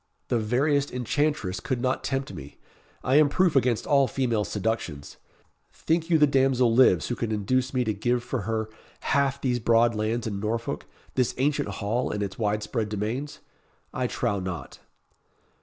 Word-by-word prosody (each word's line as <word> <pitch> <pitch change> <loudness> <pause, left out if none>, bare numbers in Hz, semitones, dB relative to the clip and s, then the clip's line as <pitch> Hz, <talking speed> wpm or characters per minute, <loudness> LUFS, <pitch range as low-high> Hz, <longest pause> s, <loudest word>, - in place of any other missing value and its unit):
The 120 - +2
veriest 140 +6 +1
enchantress 125 -5 -1
could 130 - -2
not 130 +1 -1
tempt 135 -5 -2
me. 75 -4 -10 0.5
I 130 +3 +3
am 150 -1 +6
proof 180 +1 +2
against 125 -4 +2
all 140 -2 +4
female 120 -6 0
seductions. 105 -8 -3 0.5
Think 165 +1 -1
you 165 - +5
the 150 - +6
damsel 130 -4 +3
lives 115 -9 +4
who 120 - -1
could 115 -2 -3
induce 125 +5 0
me 125 -2 +1
to 110 -2 -1
give 120 +4 0
for 120 - -3
her 110 -1 -1 0.3
half 140 -2 +1
these 125 -2 0
broad 115 +1 +3
lands 110 +2 -1
in 100 -3 -3
Norfolk 115 +2 -3 0.3
this 125 -2 0
ancient 145 -2 +1
hall, 105 +5 -1
and 105 0 -2
its 100 +2 -6
wide 105 -1 0
spread 110 -3 -2
domains? 110 +8 -4 0.5
I 125 -1 -1
trow 115 -4 -1
not." 90 -7 -6
120 Hz, 170 wpm, -26 LUFS, 105-135 Hz, 0.5 s, am